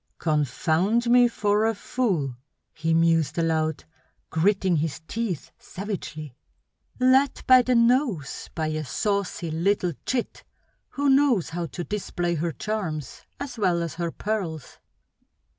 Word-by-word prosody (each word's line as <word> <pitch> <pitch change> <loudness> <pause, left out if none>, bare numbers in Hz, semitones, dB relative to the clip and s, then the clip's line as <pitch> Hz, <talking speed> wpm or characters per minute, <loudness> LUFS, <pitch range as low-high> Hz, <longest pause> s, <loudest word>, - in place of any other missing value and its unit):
"Confound 160 - +1
me 245 0 +7
for 210 -1 +1
a 225 - 0
fool!" 185 - -1 0.4
he 165 0 -2
mused 165 -1 +2
aloud, 160 -2 0 0.5
gritting 190 +1 +2
his 155 +1 -2
teeth 220 -7 -3
savagely. 155 - -6 0.6
"Led 260 +2 +3
by 255 -1 +8
the 250 0 +1
nose 235 - +1
by 160 - -1
a 155 0 -2
saucy 195 +1 -2
little 180 +2 +1
chit 250 -2 -2 0.5
who 285 0 -1
knows 270 - +4
how 170 0 -3
to 150 +6 -6
display 175 -3 -2
her 170 +1 -1
charms 160 - -4
as 270 -4 -6
well 175 -4 +2
as 165 - -4
her 170 0 -2
pearls!" 175 -7 -4
180 Hz, 125 wpm, -25 LUFS, 160-225 Hz, 0.6 s, by